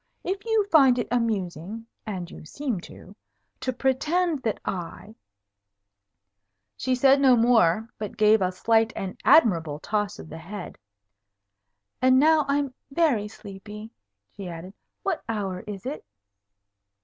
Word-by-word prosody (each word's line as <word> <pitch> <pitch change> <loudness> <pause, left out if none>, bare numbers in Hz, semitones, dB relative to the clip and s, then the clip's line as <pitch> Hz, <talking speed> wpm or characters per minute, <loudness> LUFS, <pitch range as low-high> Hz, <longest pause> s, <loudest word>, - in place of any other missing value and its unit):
If 390 +3 -3
you 445 -2 +2
find 270 -6 +6
it 240 - -1
amusing 215 -3 -2 0.2
(and 180 -5 -5
you - - -11
seem 235 - -4
to) 200 - -14 0.4
to 255 - -2
pretend 300 +5 0
that 220 -3 -2
I 185 +3 -5 0.8
" 100 +1 -56
she 260 -1 0
said 270 +2 +4
no 260 -2 +6
more, 225 -4 +3
but 210 -1 -6
gave 215 0 +5
a 185 -1 +1
slight 225 +4 +2
and 190 -1 -5
admirable 165 - +4
toss 205 +5 -2
of - - -10
the 160 +1 -9
head. 185 +3 -8 1.2
"And 255 0 +5
now 310 0 +4
I 280 0 +2
am 280 -3 -2 0.2
very 275 -9 +1
sleepy," 210 +1 -10 0.4
she 195 -2 -8
added. 170 +3 -8 0.3
"What 385 -4 -2
hour 195 -5 -2
is 200 -1 -7
it?" 280 +4 -5
220 Hz, 140 wpm, -25 LUFS, 185-265 Hz, 1.2 s, find